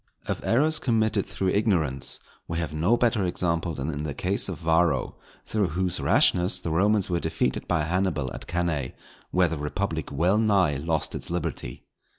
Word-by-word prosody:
Of -, -, -3 dB
errors 150 Hz, +6 st, +3 dB
committed 110 Hz, -4 st, +1 dB
through 95 Hz, -, -1 dB
ignorance 90 Hz, -, 0 dB, 0.3 s
we 85 Hz, -, -3 dB
have 85 Hz, -2 st, -2 dB
no 85 Hz, +10 st, +2 dB
better 115 Hz, -4 st, +2 dB
example 85 Hz, -2 st, -1 dB
than 70 Hz, +4 st, -3 dB
in 75 Hz, -1 st, -4 dB
the 75 Hz, -2 st, -4 dB
case 95 Hz, +2 st, -1 dB
of 90 Hz, -, -4 dB
Varro, 80 Hz, -4 st, +1 dB, 0.3 s
through 105 Hz, -3 st, 0 dB
whose 90 Hz, +1 st, -2 dB
rashness 90 Hz, +1 st, +3 dB
the 85 Hz, -2 st, -4 dB
Romans 100 Hz, +4 st, +3 dB
were 85 Hz, -2 st, 0 dB
defeated -, -, -1 dB
by 85 Hz, -3 st, +1 dB
Hannibal 80 Hz, -5 st, -1 dB
at -, -, -8 dB
Cannæ, 85 Hz, -7 st, -1 dB, 0.4 s
where 90 Hz, 0 st, +3 dB
the 80 Hz, -2 st, -4 dB
republic 80 Hz, +1 st, -3 dB
well 90 Hz, +9 st, +2 dB
nigh 95 Hz, -9 st, +3 dB
lost 80 Hz, +1 st, -1 dB
its -, -, -4 dB
liberty. 85 Hz, -7 st, -4 dB
85 Hz, 170 wpm, -26 LUFS, 80-100 Hz, 0.4 s, errors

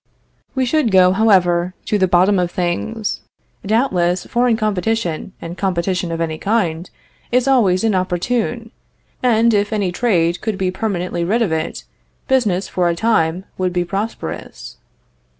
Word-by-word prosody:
We 260 Hz, -1 st, +1 dB
should 280 Hz, -1 st, +1 dB
go, 185 Hz, -2 st, +5 dB
however, 185 Hz, -3 st, +2 dB
to 210 Hz, -, 0 dB
the 190 Hz, -, +3 dB
bottom 185 Hz, +2 st, +3 dB
of 175 Hz, -1 st, 0 dB
things. 185 Hz, +5 st, -2 dB, 0.4 s
Doubtless 185 Hz, -5 st, +1 dB
foreign 240 Hz, -1 st, +1 dB
competition, 210 Hz, -4 st, -1 dB
and 170 Hz, +1 st, -7 dB
competition 180 Hz, -2 st, -1 dB
of 165 Hz, -, -3 dB
any 160 Hz, -1 st, -2 dB
kind, 180 Hz, -6 st, -1 dB, 0.4 s
is 250 Hz, +1 st, +2 dB
always 210 Hz, -9 st, +3 dB
inopportune; 225 Hz, +4 st, -1 dB, 0.5 s
and, 235 Hz, -2 st, +3 dB
if 205 Hz, 0 st, +1 dB
any 200 Hz, -4 st, 0 dB
trade 175 Hz, -4 st, +1 dB
could 215 Hz, -3 st, -2 dB
be 185 Hz, -2 st, 0 dB
permanently 185 Hz, -4 st, -2 dB
rid 220 Hz, +7 st, +1 dB
of 195 Hz, -, -1 dB
it, 160 Hz, 0 st, -3 dB, 0.4 s
business, 210 Hz, -9 st, +1 dB
for 180 Hz, -1 st, 0 dB
a 170 Hz, -, 0 dB
time, 180 Hz, -3 st, +1 dB
would 185 Hz, -1 st, 0 dB
be 175 Hz, -1 st, 0 dB
prosperous. 85 Hz, -, -5 dB
190 Hz, 145 wpm, -18 LUFS, 175-225 Hz, 0.5 s, go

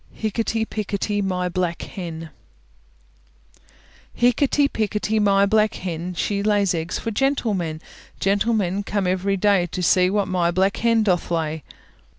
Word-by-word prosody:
HICKETY 225 Hz, +1 st, -1 dB
PICKETY 205 Hz, -1 st, -2 dB
MY 180 Hz, -2 st, -1 dB
BLACK 175 Hz, -1 st, -2 dB
HEN 165 Hz, -3 st, -7 dB, 1.9 s
Hickety, 275 Hz, +4 st, +3 dB
pickety, 215 Hz, -2 st, -1 dB
my 200 Hz, -1 st, +4 dB
black 215 Hz, +1 st, +2 dB
hen, 180 Hz, 0 st, -5 dB
She 200 Hz, +3 st, -1 dB
lays 205 Hz, -2 st, +2 dB
eggs 165 Hz, 0 st, -3 dB
for 230 Hz, -, -4 dB
gentlemen; 205 Hz, -, -1 dB, 0.4 s
Gentlemen 200 Hz, -1 st, +1 dB
come 200 Hz, -1 st, -2 dB
every 190 Hz, +2 st, 0 dB
day 195 Hz, -2 st, +3 dB
To 180 Hz, +2 st, -4 dB
see 180 Hz, +1 st, +4 dB
what 200 Hz, 0 st, 0 dB
my 180 Hz, -2 st, +1 dB
black 190 Hz, +3 st, +1 dB
hen 230 Hz, -1 st, +2 dB
doth 180 Hz, -4 st, 0 dB
lay. 160 Hz, -2 st, -2 dB
195 Hz, 135 wpm, -22 LUFS, 180-215 Hz, 1.9 s, my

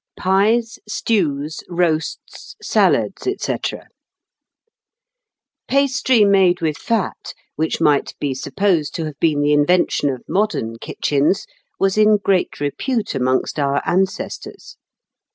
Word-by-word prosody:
Pies, 215 Hz, +5 st, +1 dB
Stews, 155 Hz, -10 st, -1 dB
Roasts, 170 Hz, -3 st, -2 dB
Salads, -, -, +1 dB
&c. -, -, -2 dB, 2.1 s
Pastry 260 Hz, -4 st, +3 dB
made 190 Hz, -3 st, +4 dB
with 155 Hz, -2 st, -1 dB
fat, 225 Hz, -5 st, -3 dB, 0.2 s
which 160 Hz, +1 st, -1 dB
might 145 Hz, -2 st, +2 dB
be 140 Hz, -2 st, -1 dB
supposed 165 Hz, +2 st, -1 dB
to 165 Hz, -, -2 dB
have 150 Hz, -2 st, -8 dB
been 155 Hz, -3 st, +2 dB
the 145 Hz, +1 st, +2 dB
invention 145 Hz, 0 st, +2 dB
of 130 Hz, -3 st, -5 dB
modern 180 Hz, -, -1 dB
kitchens, 145 Hz, +10 st, 0 dB, 0.3 s
was 195 Hz, +2 st, +1 dB
in 215 Hz, 0 st, +5 dB
great 195 Hz, -2 st, 0 dB
repute 210 Hz, -, -2 dB
amongst 130 Hz, +2 st, 0 dB
our 140 Hz, 0 st, +1 dB
ancestors. 190 Hz, +1 st, -3 dB
175 Hz, 110 wpm, -19 LUFS, 145-205 Hz, 2.1 s, in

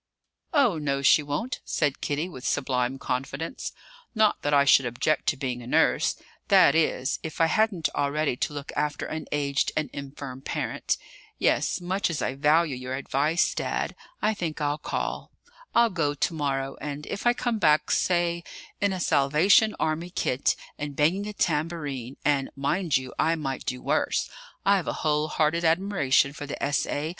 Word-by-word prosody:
"Oh 255 Hz, -, +3 dB
no, 140 Hz, -2 st, -1 dB
she 145 Hz, +4 st, +6 dB
won't," 150 Hz, -, -3 dB
said 145 Hz, -3 st, -1 dB
Kitty, 150 Hz, +4 st, -1 dB
with 130 Hz, -8 st, -10 dB
sublime 130 Hz, -2 st, 0 dB
confidence; 135 Hz, -, -4 dB, 0.4 s
"not 215 Hz, -1 st, +3 dB
that 145 Hz, -, -1 dB
I 140 Hz, -1 st, +5 dB
should 135 Hz, -2 st, +5 dB
object 125 Hz, +6 st, 0 dB
to 140 Hz, -, +2 dB
being 130 Hz, -3 st, -3 dB
a 120 Hz, -, -10 dB
nurse -, -, +2 dB, 0.3 s
that -, -, +6 dB
is, 155 Hz, -4 st, +1 dB
if 160 Hz, -, -7 dB
I 165 Hz, -, +5 dB
hadn't 195 Hz, -2 st, +2 dB
already 145 Hz, -1 st, 0 dB
to 150 Hz, -, -2 dB
look 145 Hz, -1 st, -6 dB
after 150 Hz, 0 st, -1 dB
an 160 Hz, 0 st, -5 dB
aged 140 Hz, -1 st, 0 dB
and 155 Hz, -3 st, -1 dB
infirm 135 Hz, -2 st, -7 dB
parent. -, -, -2 dB, 0.4 s
Yes; -, -, +1 dB
much 185 Hz, +2 st, -1 dB
as 165 Hz, -, -2 dB
I 130 Hz, -, -1 dB
value 150 Hz, +1 st, +2 dB
your 125 Hz, +1 st, -5 dB
advice, 145 Hz, +5 st, +1 dB
Dad, -, -, -2 dB, 0.3 s
I 220 Hz, -, +3 dB
think 170 Hz, -7 st, -4 dB
I'll 145 Hz, 0 st, -1 dB
call. -, -, -3 dB, 0.5 s
I'll 235 Hz, -1 st, +5 dB
go 150 Hz, -5 st, 0 dB
to 155 Hz, -, 0 dB
morrow; 135 Hz, -3 st, -2 dB
and 145 Hz, 0 st, -5 dB
if 200 Hz, -, -3 dB
I 240 Hz, -, +6 dB
come 240 Hz, -2 st, -1 dB
back, 155 Hz, -4 st, +3 dB
say, 175 Hz, -1 st, +1 dB, 0.4 s
in 200 Hz, -1 st, +2 dB
a 185 Hz, -, -3 dB
Salvation 170 Hz, +9 st, +4 dB
Army 160 Hz, +2 st, -1 dB
kit, 135 Hz, -7 st, 0 dB, 0.2 s
and 145 Hz, -1 st, -4 dB
banging 180 Hz, +8 st, +1 dB
a 210 Hz, -, -5 dB
tambourine 150 Hz, -, -2 dB
and, 140 Hz, -2 st, +2 dB
mind 150 Hz, +4 st, +1 dB
you! 130 Hz, -1 st, -7 dB
I 165 Hz, -, +3 dB
might 135 Hz, -5 st, -4 dB
do 125 Hz, 0 st, -3 dB
worse: -, -, 0 dB, 0.3 s
I've 195 Hz, -3 st, +3 dB
a -, -, 0 dB
whole 150 Hz, 0 st, +2 dB
hearted 155 Hz, +2 st, +1 dB
admiration 160 Hz, -6 st, +2 dB
for 145 Hz, 0 st, -7 dB
the -, -, -5 dB
S.A. 145 Hz, +1 st, 0 dB
150 Hz, 170 wpm, -26 LUFS, 140-170 Hz, 0.5 s, she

